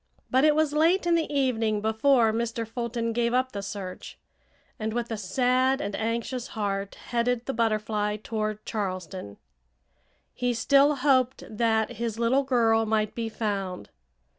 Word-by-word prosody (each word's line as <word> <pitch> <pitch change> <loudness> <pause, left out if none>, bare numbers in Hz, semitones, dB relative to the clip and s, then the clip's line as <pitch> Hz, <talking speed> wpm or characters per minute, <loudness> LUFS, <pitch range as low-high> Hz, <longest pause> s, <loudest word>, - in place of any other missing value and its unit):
But 260 +2 +4
it 305 -1 +5
was 310 -1 +2
late 335 +5 +3
in 345 - +3
the 330 -2 +1
evening 230 -6 +1
before 220 +2 +3
Mr. 230 0 -2
Fulton 235 0 -3
gave 235 +1 +1
up 255 0 +1
the 200 - -4
search, 195 -2 -7 0.6
and 215 0 -2
with 240 0 -3
a - - 0
sad 255 +6 +1
and 205 -9 -3
anxious 235 +2 -2
heart 200 -1 -2
headed 240 0 -1
the 270 - -2
Butterfly 215 -2 0
toward 215 -1 -3
Charleston. 185 - -4 1.0
He 245 -1 -1
still 280 +5 +4
hoped 260 -2 +2
that 220 +1 0
his 230 -1 -3
little 235 +4 +3
girl 225 -4 +2
might 215 -1 0
be 230 -1 -3
found. 195 - -3
230 Hz, 150 wpm, -26 LUFS, 215-255 Hz, 1.0 s, it